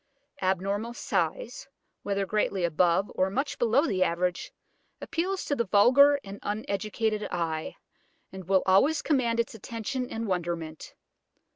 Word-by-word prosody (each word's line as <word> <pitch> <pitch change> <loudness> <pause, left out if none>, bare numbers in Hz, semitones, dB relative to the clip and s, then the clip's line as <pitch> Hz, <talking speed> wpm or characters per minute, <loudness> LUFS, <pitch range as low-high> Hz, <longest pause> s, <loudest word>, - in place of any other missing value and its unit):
Abnormal 195 +5 -1
size, - - -2 0.3
whether 200 -1 -1
greatly 200 -2 0
above 170 +3 +2
or 185 - +1
much 275 +8 -2
below 240 +6 +3
the 190 - -1
average, 175 +1 -1 0.5
appeals 370 +3 -2
to 285 - 0
the 235 -5 -1
vulgar 260 +9 +6
and 200 0 -9
uneducated 215 +1 -2
eye, 160 -2 -3 0.6
and 190 -1 -9
will 190 +1 +3
always 270 +12 +3
command 240 -6 +1
its 235 - -1
attention 230 +3 -4
and 225 +1 -4
wonderment. 170 -4 -4
205 Hz, 130 wpm, -28 LUFS, 185-240 Hz, 0.6 s, vulgar